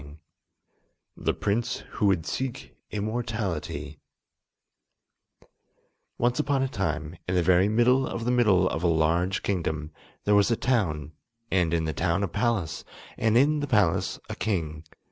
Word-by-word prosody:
] - - -47
The - - +3
Prince 115 +4 -1
Who 105 - +3
Would 90 -5 +2
Seek 130 -2 -4
Immortality 100 - -3 2.2
Once 120 +1 +1
upon 135 -1 +1
a - - +1
time, 80 - -3
in 90 - 0
the 90 - +3
very 95 +3 +4
middle 125 +4 +3
of 115 - -4
the 120 - +2
middle 105 -7 +4
of 80 - -2
a 90 - +2
large 85 +3 +1
kingdom, 80 -5 -2 0.3
there 105 - +2
was 100 -1 +5
a 115 - +3
town, 80 - 0 0.4
and 90 -4 +2
in 85 -1 +1
the 80 - -2
town 85 +7 0
a - - +1
palace, 100 -6 -1 0.3
and 115 0 +2
in 150 +4 +4
the 145 - -2
palace 95 -7 +2
a - - -5
king. 80 -7 -2
95 Hz, 150 wpm, -27 LUFS, 80-115 Hz, 2.2 s, was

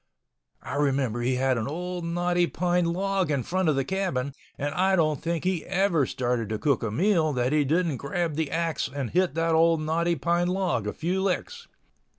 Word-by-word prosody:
I - - -4
remember 135 -5 0
he 125 +2 +1
had 130 -1 +1
an 110 - -3
old 180 +4 -4
knotty 175 +1 +1
pine 180 0 0
log 190 +1 0
in 140 -4 0
front 185 +2 0
of 150 - +2
the 135 -1 0
cabin, 160 -9 -2 0.2
and 145 +1 -2
I 190 +1 +2
don't 155 -5 +1
think 170 -1 -2
he 185 -3 0
ever 180 -6 +2
started 120 -3 -1
to 110 - -1
cook 140 +2 +1
a 115 - -1
meal 160 - +2
that 125 +2 0
he 150 -1 +3
didn't 160 0 +1
grab 165 +4 -2
the 155 -2 -1
axe 165 -4 -1
and 135 -3 -4
hit 180 -5 +1
that 165 0 +1
old 165 0 +4
knotty 165 +2 0
pine 170 +4 +1
log 185 0 0
a - - -2
few 180 +4 -1
licks. 465 - -2
165 Hz, 200 wpm, -26 LUFS, 140-180 Hz, 0.2 s, old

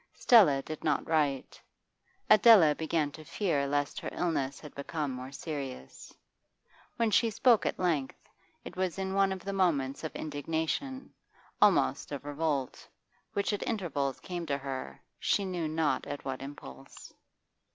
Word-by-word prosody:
Stella 165 - +5
did 155 -1 -7
not 150 -2 0
write; 145 -5 0 0.7
Adela 210 -8 +7
began 160 -1 -1
to 155 - -11
fear 155 -6 -1
lest 145 0 -1
her - - -5
illness 140 -6 -1
had 150 - -11
become 145 0 -3
more 130 +1 -7
serious. 140 - -7 0.8
When 230 -2 +1
she 230 +2 +4
spoke 235 +1 +3
at - - -2
length, 160 -7 -1 0.5
it - - -8
was 185 -1 -2
in 190 0 -3
one 195 0 +3
of 190 -1 -6
the 200 - -3
moments 150 -9 0
of 160 - -5
indignation, 160 - -3 0.5
almost - - +3
of 140 -1 -6
revolt, 145 -2 -2 0.5
which 200 +1 0
at 205 - -2
intervals 150 - -2
came 175 -2 -5
to 140 -1 0
her, 135 -1 -6 0.2
she 200 - +1
knew 175 -4 -2
not 155 -3 0
at 145 - -6
what 130 -1 -4
impulse. 70 - -11
155 Hz, 150 wpm, -30 LUFS, 140-185 Hz, 0.8 s, Adela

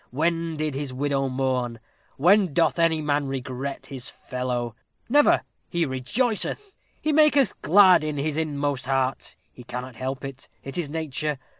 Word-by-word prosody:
When 165 +3 -1
did 155 -1 -1
his 140 0 -3
widow 135 +1 -1
mourn? 130 -3 -1 0.4
When 180 +1 +4
doth 170 0 +2
any 160 -2 +2
man 145 -1 0
regret 135 +1 -5
his 130 -3 -6
fellow? 125 -2 -4 0.3
Never! 290 +4 +4 0.3
He 170 -1 +1
rejoiceth 220 - -1 0.2
he 305 - 0
maketh 295 -3 +4
glad 180 +2 +6
in 150 -1 -3
his 145 +1 -1
inmost 145 -4 -2
heart 135 -1 -1 0.2
he 125 - -13
cannot 125 +1 -6
help 130 +2 -4
it 135 -1 -9
it 135 - -7
is 170 -5 -2
nature. 150 -1 -2
145 Hz, 150 wpm, -25 LUFS, 130-165 Hz, 0.4 s, glad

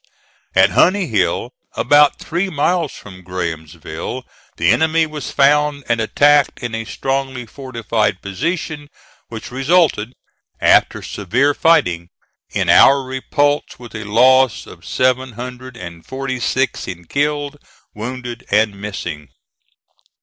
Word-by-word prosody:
At - - +5
Honey 190 +1 +3
Hill, - - 0 0.2
about 145 0 +4
three 180 +4 -2
miles 165 0 0
from 95 -2 -12
Grahamsville, 85 +4 -5 0.3
the 85 +2 +3
enemy 160 +6 +3
was 155 -2 -6
found 145 0 +2
and 115 -1 +1
attacked 145 +5 +3
in 120 -2 -4
a 115 0 -3
strongly 135 0 -3
fortified 115 -6 -2
position, 145 - -4 0.4
which 115 +1 -8
resulted, 135 -4 +2 0.5
after - - +3
severe 130 +9 0
fighting, 90 - +2 0.4
in - - -1
our 135 0 +6
repulse 145 +3 -1
with 120 -3 -12
a 110 - -5
loss 130 +3 +4
of 85 - -14
seven 130 0 0
hundred 125 +1 -8
and 85 -4 -9
forty 130 -1 -4
six 130 +2 -1
in 90 -1 -7
killed, 145 - -2 0.3
wounded, 120 +2 -6
and 105 -2 +1
missing. 85 -8 -6
130 Hz, 120 wpm, -18 LUFS, 105-145 Hz, 0.5 s, our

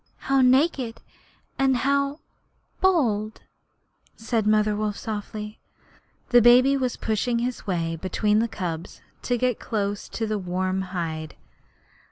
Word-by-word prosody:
How 270 0 +1
naked, 255 -3 +2 0.6
and 265 -1 +3
how 280 +3 0 0.6
bold!' 230 - +1 0.7
said 225 -1 -1
Mother 215 0 +3
Wolf, 210 -1 -2
softly. 210 0 -6 0.7
The 245 -1 +6
baby 250 +4 +6
was 255 -3 -1
pushing 225 +2 -1
his 245 -1 -3
way 165 -3 -1
between 210 +5 +1
the 230 - +1
cubs 175 -5 -6 0.2
to 245 - 0
get 250 -1 0
close 205 -2 -3
to 225 - -3
the 215 -1 -2
warm 185 +1 -1
hide. 160 -4 -4
220 Hz, 125 wpm, -24 LUFS, 200-250 Hz, 0.7 s, The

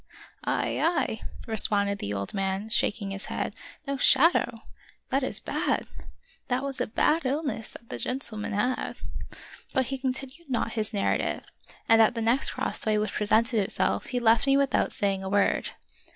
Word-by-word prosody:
" - - -34
Ay! - - 0
ay! 300 -9 +1
" - - -13
responded 200 -2 +1
the 100 - -3
old 100 -1 -3
man, 195 +2 -1
shaking 205 -2 0
his 195 0 -5
head; - - -3 0.2
" 290 - -25
no 275 0 -1
shadow? 275 +6 +4 0.5
that 270 +1 +2
is 260 - -2
bad! - - -1 0.6
That 255 0 0
was 275 -1 -1
a - - 0
bad 310 +8 +2
illness 275 -4 -1
that 235 - -11
the - - -5
gentleman 225 -5 -1
had." 245 +6 -1 0.8
But 260 - +2
he 270 - -3
continued 270 +4 -4
not 235 -2 0
his 220 -2 -1
narrative, 205 -3 0 0.4
and 225 0 +7
at 225 +3 +4
the 230 - -2
next 235 +4 +3
crossway 215 -1 0
which 210 0 -1
presented 225 +3 +2
itself 195 - 0
he 250 - -1
left 230 +2 +4
me 275 0 +5
with 275 -2 +1
out - - +2
saying 195 -1 0
a 190 - -3
word. 200 0 +2
230 Hz, 180 wpm, -27 LUFS, 205-265 Hz, 0.8 s, and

